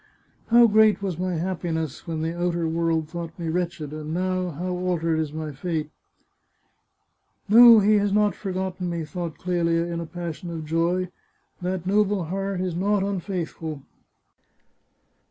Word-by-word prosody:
" - - -37
How 235 +1 +7
great 215 -2 +4
was 180 -4 -3
my 185 -1 -1
happiness 165 -3 -3
when 160 -1 -3
the 165 +1 -2
outer 175 -1 0
world 165 -1 0
thought 165 0 -7
me 170 -2 -3
wretched! 165 -3 -3
and 155 +1 -5
now, 185 0 -1
how 175 +4 -4
altered 170 -3 0
is 155 -2 -2
my 155 0 -5
fate! 155 +1 -3 0.5
" - - -45 0.2
" - - -47
No, 230 +2 +9
he 210 +1 +4
has 205 0 0
not 210 0 +3
forgotten 185 -2 -3
me," 170 -2 -3
thought 170 -1 -5
Clelia 170 -2 0
in 170 -1 -4
a 170 - -5
pas 170 -2 -5
sion 175 - -8
of 165 -2 -5
joy. 170 +3 0 0.3
" - - -42
That 180 0 -3
noble 205 -1 +2
heart 195 +2 -3
is 180 -2 -2
not 200 +2 +1
unfaithful." 170 -6 -4
175 Hz, 170 wpm, -24 LUFS, 165-190 Hz, 0.5 s, No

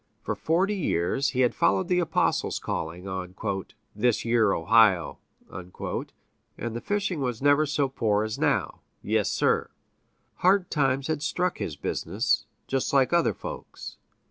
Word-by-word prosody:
For - - -1
forty 185 +6 +1
years 140 - 0
had 125 -3 +2
he - - -24
followed 95 +2 +2
the 180 -1 +2
apostles' 170 -3 0
calling 85 +4 -4
on 95 -1 -5 0.6
"this 115 +2 +1
yere 115 -3 +3
Ohio," 95 -1 +3 0.3
and 95 +5 -7
the 120 - -4
fishing 200 -6 -1
was 125 -4 -2
never 145 +2 +4
so 145 -1 +1
poor 110 -5 0
as 110 0 -4
now - - 0 0.2
yes, - - +1
sir! - - +1 0.7
hard 185 0 +3
times 135 -2 +1
had 155 -1 -2
struck 180 +3 -1
his 75 - -3
business, - - -1 0.2
just 135 -1 -1
like 135 0 +3
other 170 -1 +3
folks'. - - -8
130 Hz, 145 wpm, -26 LUFS, 105-155 Hz, 0.7 s, never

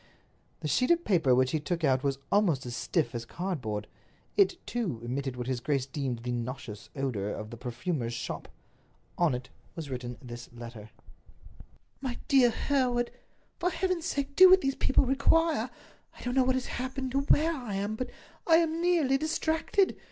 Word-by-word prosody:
The - - -2
sheet 250 - +2
of 345 0 +3
paper 160 -10 +4
which 130 0 +3
he 155 - +1
took 165 +3 -3
out 130 -2 +3
was 140 -1 0
almost 180 -11 +3
as 120 -1 -4
stiff 120 0 0
as 120 -1 -3
cardboard. 120 - -3 0.5
It, 390 -3 +4
too, 210 - -2
emitted 130 +2 -3
what 125 -1 -4
his 130 -1 -1
grace 135 +1 0
deemed 135 -4 -3
the 125 - -2
nauseous 120 -3 -5
odors 120 -8 -2
of 105 0 -7
the 120 - -7
perfumer's 120 +2 -3
shop. - - -5 0.7
On 170 -7 +3
it 125 0 -7 0.3
was 160 -5 -6
written 125 -1 -5
this 120 -2 -9
letter: 115 -3 -9 1.1
"MY 255 -3 -3
DEAR 265 -4 +6
HEREWARD—For 255 +7 -2
Heaven's 365 -3 -1
sake 280 0 -2
do 375 +2 +10
what 375 0 +7
these 270 0 +1
people 270 0 +3
require! 280 0 +2 0.5
I - - -11
don't 245 - -2
know 260 -1 +4
what 260 0 +3
has 260 - -1
happened 260 0 -4
or 275 - +2
where 310 +3 +3
I 245 -9 -5
am, 200 +2 -1
but 255 +2 -4 0.4
I 325 - +7
am 330 0 +2
nearly 320 -7 +3
distracted! 320 +5 +1
180 Hz, 175 wpm, -29 LUFS, -, 1.1 s, do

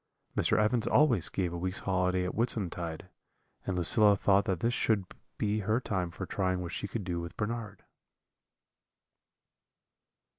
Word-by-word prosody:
"Mr. - - +2
Evans 110 +2 +2
always 125 - +4
gave 90 -3 -2
a - - -3
week's 95 +2 -2
holiday 90 -1 +1
at 90 - -3
Whitsuntide, 90 -8 -2 0.6
and 95 -2 -1
Lucilla 105 +4 +5
thought 100 0 +3
that 95 -3 -1
this 115 +5 +1
should 110 -6 +1 0.3
be 105 0 0
her 110 +3 +1
time 95 -8 -2
for 95 +2 -6
trying 95 -1 -1
what 85 -1 -5
she 100 - -4
could 105 +1 -4
do 90 -2 -2
with 85 +1 -8
Bernard." 105 -2 -4
95 Hz, 150 wpm, -30 LUFS, 90-110 Hz, 0.6 s, Lucilla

